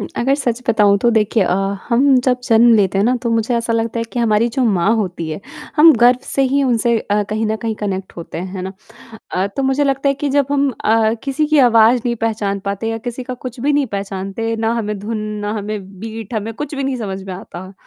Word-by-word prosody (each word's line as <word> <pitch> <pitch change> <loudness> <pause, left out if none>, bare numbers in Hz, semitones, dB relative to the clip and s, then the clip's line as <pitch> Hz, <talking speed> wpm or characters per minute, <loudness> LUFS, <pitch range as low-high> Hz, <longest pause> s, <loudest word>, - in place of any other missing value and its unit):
उम, - - -4
अगर 265 +3 +2
सच 250 -4 -2
बताऊँ 210 -3 +4
तो 240 - +2
देखिए 220 -1 +2
अ, 180 - +1 0.3
हम 265 +3 +4
जब 250 -1 +2
जन्म 235 -1 +5
लेते 195 -3 +2
हैं 200 - +3
ना, 245 +3 +3
तो 235 - -1
मुझे 230 +1 0
ऐसा 230 0 -1
लगता 230 0 -1
है 230 - -1
कि - - -3
हमारी 230 0 +2
जो 250 +3 -1
माँ 200 -1 +2
होती 180 -6 -3
है, 155 - -5 0.4
हम 315 +2 +8
गर्व 245 +2 +5
से 275 - -1
ही 280 0 +3
उनसे 235 -2 +2
अ, 210 -1 0
कहीं 215 +1 -1
न 215 +1 -1
कहीं 225 -1 -1
कनेक्ट 190 -2 -3
होते 170 -1 -7
हैं, 180 - -4
है 185 - -4
ना। 190 +1 -5 0.6
अ, 185 +1 0
तो 275 - 0
मुझे 270 +2 +1
लगता 275 0 +1
है 275 - +2
कि 285 +1 -3
जब 280 0 +2
हम 280 -1 +2
अ, 220 0 +3
किसी 280 +2 0
की 305 0 +2
आवाज़ 235 -1 +5
नहीं 240 -1 0
पहचान 210 -3 -1
पाते 200 +3 -3
या 225 0 -2
किसी 245 +1 -4
का 255 0 -5
कुछ 250 0 -8
भी 290 +4 +1
नहीं 285 -1 +2
पहचानते, 200 +2 -4
ना 225 0 0
हमें 210 -3 -3
धुन, 215 +3 -4 0.2
ना 205 0 -3
हमें 200 -2 -6
बीट 225 0 -7
हमें 220 +1 -3
कुछ 295 +4 -5
भी 275 - -3
नहीं 270 -1 -1
समझ 195 -5 -5
में 190 - -6
आता, 185 0 -9
225 Hz, 245 wpm, -18 LUFS, 205-255 Hz, 0.6 s, हम